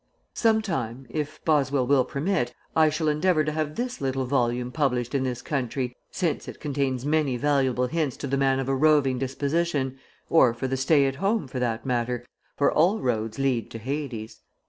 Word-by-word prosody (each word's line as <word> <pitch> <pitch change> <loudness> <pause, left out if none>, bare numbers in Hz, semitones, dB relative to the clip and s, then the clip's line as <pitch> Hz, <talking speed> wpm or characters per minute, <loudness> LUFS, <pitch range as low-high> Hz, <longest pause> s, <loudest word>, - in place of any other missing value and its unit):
Some 220 -1 +2
time, 135 - -3
if 155 +1 -4
Boswell 140 -4 +2
will 135 0 +4
permit, 140 -4 -1 0.2
I 160 -1 +5
shall 155 +1 -1
endeavor 155 +2 +2
to 155 - -1
have 155 -1 -2
this 250 +1 -3
little 135 -1 -1
volume 125 -1 0
published 125 -4 0
in 140 - +1
this 125 -2 -3
country 125 -2 -2
since 175 -4 -2
it - - -8
contains 135 -3 -1
many 150 -4 +1
valuable 130 -2 +2
hints 150 -2 -1
to - - -5
the 140 - 0
man 135 -1 +2
of 135 - -2
a 135 - +1
roving 135 -2 +3
disposition, 140 0 -1 0.3
or 130 -8 +4
for 125 +3 -3
the 135 - -1
stay 140 +2 +3
at 135 0 -1
home, 200 -1 0
for 130 0 -5
that 115 -2 -1
matter, 120 -1 -1 0.3
for 140 - +3
all 180 +8 +3
roads 110 -3 -1
lead 130 -4 0
to - - -7
Hades. 125 -2 -5
135 Hz, 190 wpm, -26 LUFS, 125-155 Hz, 0.3 s, I